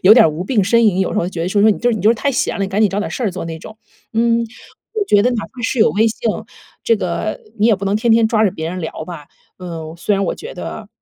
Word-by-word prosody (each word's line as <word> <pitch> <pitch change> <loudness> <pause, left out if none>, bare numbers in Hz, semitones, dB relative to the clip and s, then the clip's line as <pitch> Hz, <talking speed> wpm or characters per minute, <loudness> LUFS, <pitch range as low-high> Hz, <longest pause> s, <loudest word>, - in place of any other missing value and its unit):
有 210 +4 +9
点 220 -10 +6
无 160 +4 -5
病 210 -1 +1
呻 230 +4 +3
吟， 210 -5 +3
有 190 - 0
时 - - 0
候 175 - 0
觉 165 -3 -4
得 175 - -1
说， 205 +1 +1
说 220 - +6
你 - - -5
就 245 +1 +2
是 220 - 0
你 - - -4
就 210 - +4
是 235 - +5
太 280 +5 -1
闲 250 - -1
了， 200 - -2
你 195 - -1
赶 205 +2 -1
紧 215 - +5
找 195 +1 -2
点 210 - -3
儿 - - -10
事 250 - -3
儿 200 - +1
做 180 - -5
那 160 -1 -6
种。 215 +6 -11 0.4
嗯， 230 +1 +2 0.5
我 425 -2 0
觉 205 - +5
得 250 - +3
哪 225 -3 -2
怕 255 - -12
是 230 - -1
有 - - +5
微 220 +3 +2
信， 225 0 -1 0.5
这 230 - +4
个 200 +3 -3 0.2
你 215 - +4
也 225 - +5
不 200 +1 -5
能 200 +2 +1
天 230 +2 +1
天 225 0 +5
抓 220 -1 +2
着 200 - +3
别 160 +1 -4
人 185 0 -5
聊 160 -1 -5
吧。 165 -4 -9 0.3
呃， 165 -3 -7
虽 205 +4 0
然 195 0 0
我 - - -1
觉 475 +3 -9
得， - - -7
210 Hz, 345 characters per minute, -18 LUFS, 185-230 Hz, 0.5 s, 有